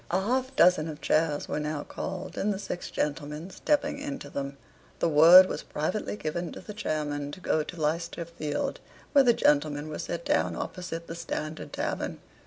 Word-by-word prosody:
A 180 - +2
half 255 +6 -1
dozen 175 -6 +5
of 155 -2 -6
chairs 155 -2 +1
were - - -2
now 150 -1 -2
called, 190 0 -6
and 210 - 0
the 195 - -2
six 190 -2 -5
gentlemen 150 +4 -3
stepping 290 +3 0
into 285 -1 -6
them, 140 0 -4 0.4
the - - +1
word 165 +4 +9
was - - -4
privately 180 +8 -2
given 170 +1 -3
to - - -8
the 210 - -9
chairmen 145 -7 -2
to - - -8
go 160 -3 +1
to 165 +3 -7
Leicester 165 +2 -1
Field, 155 -3 -3 0.3
where 280 -2 +6
the 240 -2 +5
gentlemen 150 -3 +2
were 150 - -5
set 170 0 -4
down 85 +1 +1
opposite 170 - -5
the 165 - -6
"Standard 160 -2 -5
Tavern." - - -3
165 Hz, 185 wpm, -28 LUFS, 150-185 Hz, 0.4 s, word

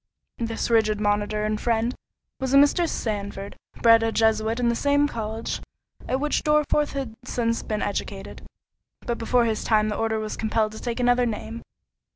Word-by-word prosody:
This 230 0 -2
rigid 215 -2 +3
monitor 210 0 0
and 215 0 -1
friend 230 +1 +1 0.5
was 265 0 0
a - - +8
Mr. 305 +4 +4
Sandford, 200 -2 -4 0.3
bred 230 -1 +7
a 225 0 +1
Jesuit 220 +1 +1
in 245 - +1
the 235 - +2
same 285 +3 +2
college 225 -3 -4 0.5
at 260 - 0
which 295 +1 0
Dorriforth 300 -1 +2
had 270 -5 -4
since 230 -2 -1
been 215 -1 -3
educated, 200 -1 -4 0.6
but 235 -1 -3
before 240 +1 +2
his 220 -2 -1
time 215 -1 +2
the 210 - -2
order 225 0 0
was 215 -1 -4
compelled 220 -1 0
to 220 - -9
take 240 0 -3
another 245 0 +3
name. 225 +1 -5
225 Hz, 175 wpm, -24 LUFS, 215-245 Hz, 0.6 s, a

